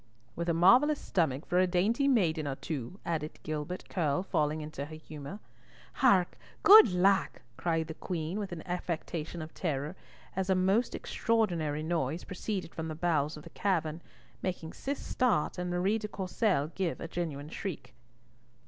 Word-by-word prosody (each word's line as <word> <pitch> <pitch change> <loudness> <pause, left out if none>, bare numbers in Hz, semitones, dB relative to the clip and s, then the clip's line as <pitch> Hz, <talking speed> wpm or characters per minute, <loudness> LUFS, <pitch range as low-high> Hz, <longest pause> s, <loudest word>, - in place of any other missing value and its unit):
"With 170 +1 -2
a - - +3
marvellous 255 - +6
stomach 155 -4 0
for 180 - +2
a 185 - +4
dainty 210 +10 +2
maiden 170 - +2
or 135 - -2
two," 150 - -5
added 155 -2 -2
Gilbert 155 +4 -4
Curll, 155 -2 0
falling 155 -4 0
into 150 -2 -5
her 155 +1 -9
humour. 155 +1 -8 0.6
"Hark! 195 -9 +4 0.2
Good 420 - +10
lack!" 190 +2 +2
cried 165 +1 0
the 160 - -6
Queen, 170 +3 -3
with 200 -3 -4
an 170 -2 -6
affectation 170 -2 -3
of 155 - -10
terror, 150 -1 -2 0.4
as 190 0 -1
a 190 - +4
most 195 +6 +2
extraordinary 170 -10 0
noise 160 -1 -1
proceeded 185 -1 -4
from 160 0 -4
the 155 - -4
bowels 155 -3 0
of 150 - -10
the - - -12
cavern, 170 -5 -1 0.4
making 175 -3 -3
Cis 280 +1 -3
start 210 -9 0
and 180 0 -2
Marie 185 +5 +1
de 210 - -4
Courcelles 190 - 0
give 185 -4 -2
a - - -5
genuine 155 -4 -4
shriek. 185 +1 -6
175 Hz, 165 wpm, -31 LUFS, 155-190 Hz, 0.6 s, Good